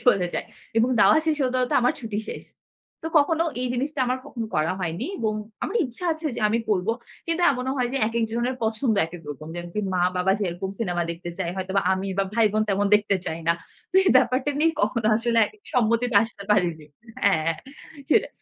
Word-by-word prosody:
চলে 195 -7 +4
যায়। - - -2 0.3
এবং 230 +2 +3
দাওয়া 200 +1 +7
শেষ 310 -2 +1
হতে, 255 0 0
হতে 250 - -1
আমার 250 - +3
ছুটি 220 -4 -4
শেষ। - - -6 0.6
তো - - -4
কখনো 320 +3 +2 0.2
এই 255 - -1
জিনিসটা, 275 +3 -2
আমার 255 +1 0
কখনো 230 -3 -5
করা 155 +2 +1
হয়নি 175 +7 -2
এবং 220 -2 0 0.3
আমার 460 - -1
ইচ্ছা 250 +8 -9
আছে 315 0 -5
যে, - - -3
আমি 225 +2 +1
করব। 200 -2 +1 0.4
কিন্তু 330 +1 0
এমনও 260 -1 -2
হয় 250 -2 +1
যে, - - -1
একেক 230 0 0
জনের 240 +3 0
পছন্দ, 220 +1 +1
একেক 165 0 -10
রকম। 145 +1 -8
যেমনকি 175 +3 -4
মা-বাবা 180 +1 +2
যেরকম 190 0 -2
সিনেমা 175 -6 -1
দেখতে 170 +1 -6
চায়, 175 -3 -1
হয়তোবা 190 +1 0
আমি 190 +1 -2
বা 195 - +3
ভাই-বোন 215 -2 +3
তেমন 200 +1 +2
দেখতে 205 -1 +3
চাই 160 - -3
না। - - +6 0.4
তো - - -30
এই - - +4
ব্যাপারটা 255 +2 +2
নিয়ে 330 +1 +4
কখনো 235 -3 +1
আসলে 230 0 +1
একই 430 - -16
সম্মতিতে 235 0 +2
আসতে 225 -3 -5
পারিনি 170 -7 +1 0.4
হ্যাঁ, 165 -5 +3 0.6
সেটা - - +3
220 Hz, 195 wpm, -24 LUFS, 185-250 Hz, 0.6 s, দাওয়া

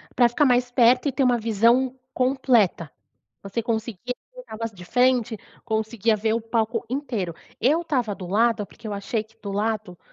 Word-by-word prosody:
Pra 240 -1 +5
ficar 290 +5 +2
mais 245 -1 +2
perto 245 +2 +4
e 280 - +1
ter 270 +1 0
uma 245 -1 +3
visão 235 +4 +2 0.2
completa. 250 - +2 0.5
Você 200 +4 -3
conseguia 230 0 -3 0.2
ver - - -9
o - - -24
negócio 225 -1 -5
de 180 - -10
frente, 245 +1 +2 0.3
conseguia 220 0 0
ver 220 +1 0
o 230 - 0
palco 225 0 -1
inteiro. 235 - -3 0.3
Eu 300 +8 +3
estava 250 -10 -1
do 185 -2 -8
lado, 215 +2 +2
porque 225 +3 -13
eu 210 - -4
achei 210 +2 -2
que 225 +1 -27
do 200 - -6
lado 205 -3 -2
230 Hz, 185 wpm, -24 LUFS, 215-250 Hz, 0.5 s, Pra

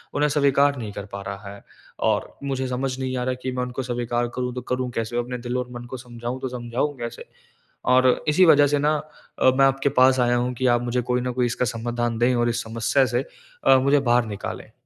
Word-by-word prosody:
उन्हें 145 +1 +3
स्वीकार 140 0 +3
नहीं 110 -4 -5
कर 100 - -6
पा 100 - -5
रहा 100 +1 -7
है। 100 - -14 0.5
और - - -1
मुझे 130 -1 -2
समझ 130 +1 -2
नहीं 130 0 -2
आ 125 - -1
रहा 130 0 0
कि 130 - -2
मैं 125 0 -2
उनको 125 +1 -4
स्वीकार 120 -1 -1
करूँ 125 -1 -2
तो 125 - -3
करूँ 125 +1 -2
कैसे? 115 +1 -3
अपने 125 +1 -2
दिल 120 +1 -3
और 125 -1 -3
मन 120 0 -8
को 130 - -4
समझाऊँ 120 +1 -6
तो 130 - -3
समझाऊँ 125 +4 -2
कैसे? 120 0 -6 0.6
और 130 0 +4
इसी 180 +5 +5
वजह 145 -3 +6
से 145 0 +1
ना 150 +1 +2 0.4
अ, - - +4
मैं 135 +1 +4
अ, - - +7
आपके 135 +1 +1
पास 130 0 +5
आया 120 0 +3
हूँ 125 +1 -1
कि 130 +1 0
आप 120 - -1
मुझे 125 +1 0
कोई 125 0 +1
न 125 0 -2
कोई 125 -1 +1
इसका 125 +1 -1
समाधान 120 0 -2
दें 120 +2 +3
और 120 0 +2
इस 120 +1 -2
समस्या 115 +4 +1
से 125 - +2 0.4
अ, 135 - +6
मुझे 140 +2 +3
बाहर 120 -2 +2
निकालें। 105 -2 -6
125 Hz, 240 wpm, -23 LUFS, 120-130 Hz, 0.6 s, अ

